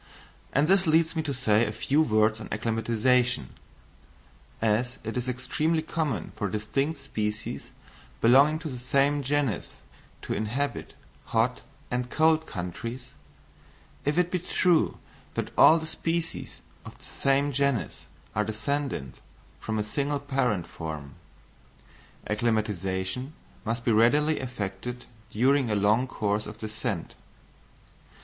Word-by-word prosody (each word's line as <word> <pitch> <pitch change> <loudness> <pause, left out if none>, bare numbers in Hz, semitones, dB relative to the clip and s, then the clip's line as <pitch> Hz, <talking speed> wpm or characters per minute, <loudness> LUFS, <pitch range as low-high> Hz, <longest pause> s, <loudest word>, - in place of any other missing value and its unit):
and 140 +3 +3
this 190 0 +4
leads 160 +1 +3
me 160 - +1
to 155 -2 -3
say 115 -4 +3
a 105 - -1
few 135 +7 +1
words 110 -4 +2
on - - -7
acclimatisation. 115 - +1 1.1
As 115 +4 +1
it 110 0 -4
is 125 0 -1
extremely 150 +6 0
common 155 -7 -2
for 105 - -2
distinct 135 - -1
species 105 -2 -4 0.5
belonging 140 +6 +6
to 160 0 -6
the 130 -4 -5
same 140 +3 +2
genus 140 -7 -1 0.5
to - - -2
inhabit 120 +7 -2 0.3
hot 115 +2 +1 0.3
and 125 0 -1
cold 160 +1 +3
countries, 115 +8 -6 0.9
if 145 +3 0
it 180 0 +2
be 180 - +1
true 175 -1 +2 0.4
that - - -2
all 160 - +8
the 160 - -4
species 165 +1 -3 0.2
of - - -11
the - - -19
same 140 +1 +1
genus 140 -3 -1 0.3
are 105 - +1
descended 110 - -2 0.5
from 110 0 -3
a 105 - +1
single 140 +6 -1
parent 130 -10 0
form, 75 -5 -7 1.1
acclimatisation 105 - -1 0.3
must 115 +2 -3
be 120 - +3
readily 145 +8 +4
effected 120 -1 -5 0.2
during 130 +3 +3
a 105 - +1
long 105 +5 +3
course 105 -2 -1
of 105 0 -8
descent. 110 -4 -4
125 Hz, 130 wpm, -27 LUFS, 110-145 Hz, 1.1 s, all